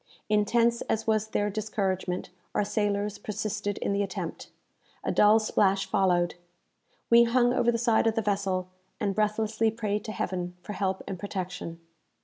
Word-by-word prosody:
Intense 230 +3 +3
as 220 - 0
was 220 -1 +1
their 205 -1 0
discouragement, 195 -4 -2 0.2
our - - +3
sailors 205 0 -1
persisted 210 -1 -3
in - - -1
the 200 - +1
attempt. 195 -2 -4 0.5
A - - 0
dull 210 +1 +6
splash 195 -3 +2
followed. 180 -2 +2 0.8
We 235 0 +8
hung 245 +1 +3
over 240 -1 +3
the 230 - 0
side 230 -1 +3
of 225 - +2
the 225 - 0
vessel, 195 -2 -1 0.3
and 200 -1 0
breathlessly 215 +1 +1
prayed 210 -2 -2
to 215 - -4
Heaven 180 -3 -3
for 210 - -6
help 190 -2 -1
and 190 -3 -5
protection. 185 -4 -5
210 Hz, 155 wpm, -28 LUFS, 195-220 Hz, 0.8 s, We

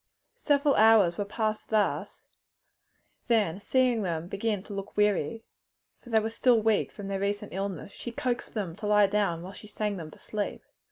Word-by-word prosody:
Several 285 -1 +3
hours 215 -6 +5
were 205 - 0
passed 215 +1 -2
thus, 215 -2 0 1.0
then 210 -7 +2
seeing 250 -1 +2
them 170 -3 -2
begin 200 +1 -2
to 205 - -9
look 195 +1 -7
weary 210 0 +1 0.6
for 245 - -15
they 225 -1 +4
were 220 +1 -3
still 235 +1 +3
weak 220 -1 +1
from 205 -2 -8
their 195 -1 -2
recent 205 +1 -2
illness 195 -1 -4
she 240 - -7
coaxed 245 0 -3
them 190 -6 -3
to 210 - -4
lie 210 0 +5
down 195 -4 0
while 190 +2 -8
she 210 - -12
sang 210 -1 -3
them 160 -3 -7
to - - -15
sleep. 210 -1 -4
210 Hz, 180 wpm, -28 LUFS, 195-225 Hz, 1.0 s, hours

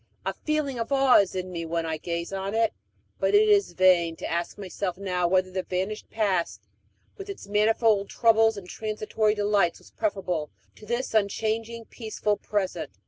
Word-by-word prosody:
A - - -1
feeling 300 -5 -2
of 230 +4 -3
awe 270 -2 +5
is 200 -2 0
in 185 0 -4
me 170 -2 -4
when 165 0 -2
I 160 -1 -2
gaze 170 +3 -4
on 195 +2 -3
it; 225 -1 +2 0.5
but - - +2
it 430 +1 +6
is 410 -1 +3
vain 175 -3 +4
to - - -7
ask 170 +1 -2
myself 190 -2 -4
now 180 -3 0
whether 185 +1 +2
the 185 0 -2
vanished 190 +4 -4
past, 195 -6 -1 0.5
with 395 0 -8
its 395 - -7
manifold 210 0 +2
troubles 225 -1 +3
and 190 -3 -8
transitory 215 +1 -1
delights, 205 -4 +2
was - - -18
preferable 180 - -2 0.3
to 215 - -14
this 240 +2 -2
unchanging 225 +2 -1
peaceful 215 -3 -2
present. 205 -2 -3
205 Hz, 175 wpm, -26 LUFS, 185-225 Hz, 0.5 s, it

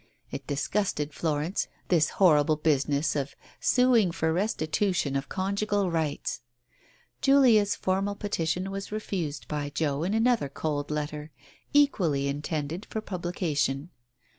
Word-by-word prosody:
It - - -6
disgusted 150 0 -1
Florence, 160 +3 -1 0.2
this 160 -4 +4
horrible 155 -5 +5
business 150 -1 +1
of 140 -1 -2 0.3
sueing 245 -7 +4
for 160 -1 0
restitution 180 -4 0
of 135 0 -2
conjugal 200 0 0
rights! 160 -3 -2 0.8
Julia's 245 -7 +5
formal 195 +2 -1
peti 200 -5 -2
tion 180 +4 -1
was 195 +1 -5
refused 180 -9 -3
by 145 -1 -3
Joe 145 -1 -1
in 190 +6 0
another 225 - +2
cold 145 0 -3
letter, 150 0 -3 0.4
equally 180 - +3
intended 150 +5 -3
for 220 - -3
publication. 175 -6 -2
165 Hz, 120 wpm, -28 LUFS, 150-200 Hz, 0.8 s, horrible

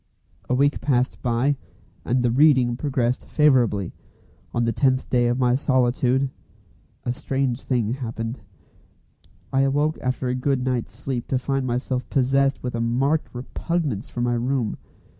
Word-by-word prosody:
A 125 - +2
week 140 +2 +2
passed 130 -2 0
by, 125 +3 +1 0.5
and 125 +1 +1
the 120 - +2
"reading" 130 -3 +4
progressed 125 -2 -1
favourably. 120 - +2 0.6
On 120 0 0
the 115 - +1
tenth 130 +2 +1
day 120 -1 +3
of 120 +1 +1
my 125 -1 +3
solitude, 130 0 +2 0.7
a 120 - 0
strange 130 -1 -1
thing 120 -4 0
happened. 115 -2 -4 1.1
I 135 - +3
awoke 145 +3 +1
after 130 0 -1
a 125 - 0
good 130 0 0
night's 125 -8 -1
sleep 125 -1 -4
to 130 - +1
find 135 0 -1
myself 125 +1 -2
possessed 135 +1 +2
with 125 - -3
a 115 - -2
marked 135 +7 +1
repugnance 130 - -3
for 120 - -4
my 120 0 +1
room. 120 -1 0
125 Hz, 150 wpm, -23 LUFS, 120-135 Hz, 1.1 s, reading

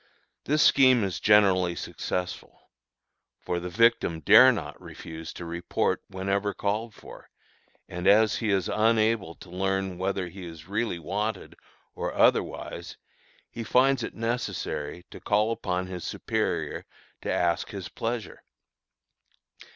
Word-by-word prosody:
This 150 +2 +3
scheme 130 -4 +5
is 95 -3 -2
generally 95 -4 +4
successful; 90 +1 -5 0.7
for 90 - -3
the 90 +1 -5
victim 115 -4 +2
dare - - +8
not - - -6
refuse 80 0 -9
to 85 - -8
report 85 +1 -1
whenever 100 +2 -2
called 105 +2 -2
for, - - -13 0.6
and 90 +1 -4
as 105 +2 +5
he 110 - -2
is 95 -2 +1
unable 110 -5 +1
to 90 - -14
learn 95 0 -2
whether 95 -1 -1
he 95 +2 -10
is 80 -2 -10
really 105 -1 -1
wanted 100 +5 -4 0.4
or - - -4
otherwise, - - 0 0.5
he 115 - -6
finds 130 +3 +3
it 115 - -5
necessary 115 -8 -3
to - - -10
call 105 +2 +1
upon 95 -5 -2
his 90 -1 -7
superior - - -2 0.4
to - - -3
ask 85 -1 0
his 95 -4 -6
pleasure. 115 -1 -5
100 Hz, 130 wpm, -27 LUFS, 90-110 Hz, 0.7 s, dare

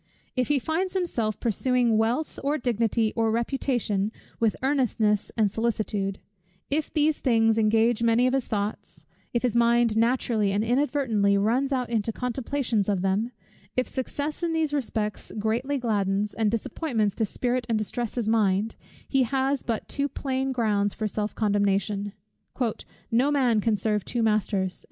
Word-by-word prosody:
If 255 -2 +1
he 295 - +3
finds 340 +8 -1
himself 235 - -1
pursuing 245 0 +1
wealth, 230 +8 0
or 290 +2 +1
dignity, 230 -3 +1
or 225 -1 +2
reputation, 230 -3 0 0.3
with 225 -2 +2
earnestness 230 -7 +1
and 210 -3 +3
solicitude; 210 -3 -1 0.5
if 300 +1 0
these 305 -1 +2
things 225 -3 +3
engage 225 +1 +3
many 230 +1 +3
of 255 - +2
his 270 -2 0
thoughts; 205 0 -4 0.3
if 235 - -1
his 245 -2 +1
mind 235 -1 +3
naturally 230 -3 +2
and 205 +2 +1
inadvertently 235 -5 +2
runs 240 +7 +1
out 250 -3 -1
into 225 -1 0
contemplations 250 -3 -1
of 190 -3 0
them; 200 +5 0 0.5
if 255 - +2
success 285 +4 -3
in 340 -1 0
these 315 -2 0
respects 220 -6 -2
greatly 235 +7 0
gladdens, 205 -4 0
and 220 -2 +1
disappointments 225 - -1
dispirit 245 +3 -1
and 225 - +2
distress 220 +2 -3
his 235 -4 -1
mind; 215 -1 +2 0.3
he 270 - +2
has 265 +2 +1
but 230 -2 -3
too 285 0 -1
plain 265 -1 -2
grounds 210 -5 +1
for 215 - -1
self 210 0 -3
condemnation. 205 -1 0 1.0
"No 245 +5 +3
man 250 -7 +2
can 220 0 +2
serve 210 0 0
two 240 -2 -2
masters." 200 -4 0
230 Hz, 150 wpm, -26 LUFS, 210-260 Hz, 1.0 s, he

